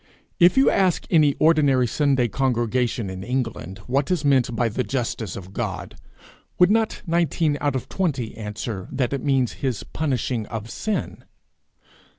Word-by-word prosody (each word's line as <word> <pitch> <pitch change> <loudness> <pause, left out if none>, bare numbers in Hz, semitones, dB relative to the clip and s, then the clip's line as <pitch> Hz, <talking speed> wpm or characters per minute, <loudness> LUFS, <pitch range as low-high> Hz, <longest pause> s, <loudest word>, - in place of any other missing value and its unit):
If 175 +4 +6
you 270 - +5
ask 185 -3 +2
any 150 -5 +4
ordinary 145 -5 +4
Sunday 135 0 +2
congregation 120 -1 0
in 95 0 -6
England, 115 -6 -3
what 135 +2 0
is 175 -5 0
meant 130 -4 +3
by 120 0 +1
the 115 +3 -1
justice 115 -7 -3
of 95 0 -9
God, 100 -2 -4 0.6
would 180 +2 +5
not 225 0 +1
nineteen 165 -3 +1
out 145 -2 0
of 130 0 -3
twenty 135 - -2
answer, 105 -2 -5
that 130 -1 -1
it 135 - -3
means 135 -4 +1
his 130 -6 -1
punishing 130 -6 -2
of 115 -1 -6
sin? 215 -1 -3
130 Hz, 155 wpm, -23 LUFS, 115-150 Hz, 0.6 s, If